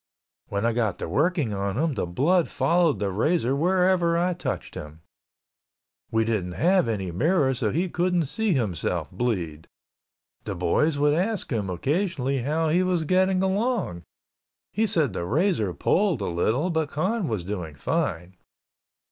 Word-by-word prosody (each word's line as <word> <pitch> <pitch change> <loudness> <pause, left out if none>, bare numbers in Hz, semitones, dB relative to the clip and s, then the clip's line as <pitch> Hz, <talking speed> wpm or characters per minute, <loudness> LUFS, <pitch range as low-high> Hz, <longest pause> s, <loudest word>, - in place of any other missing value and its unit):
When 100 +2 -2
I 115 - +2
got 110 -6 0
to - - -5
working 145 - +1
on 100 +1 -2
him, 155 +1 +1
the 100 -7 -2
blood 160 - +2
followed 160 - +2
the 100 -1 -2
razor 135 - +1
wherever 180 +1 +2
I 180 +1 +1
touched 175 - -4
him. 75 +2 -9 1.1
We 110 0 +1
didn't 100 -6 -1
have 180 - +2
any 95 -5 -2
mirror 140 - +2
so 120 -4 -1
he 170 - 0
couldn't 175 -1 0
see 205 +8 0
himself 105 - -2
bleed. 85 -10 -3 0.8
The - - -4
boys 145 - +1
would 145 +1 +3
ask 190 +3 0
him 105 -4 -1
occasionally 140 - -1
how 155 +5 0
he 175 +4 +3
was 180 -3 +1
getting 185 +3 +2
along, 195 - -1 0.7
he 220 +2 +1
said 160 - +1
the 85 - -3
razor 135 - +1
pulled 175 - +1
a - - -1
little 115 - 0
but 160 -3 0
Con 190 +6 -1
was 110 -8 -2
doing 90 -5 -5
fine. 90 - -2
145 Hz, 155 wpm, -25 LUFS, -, 1.1 s, would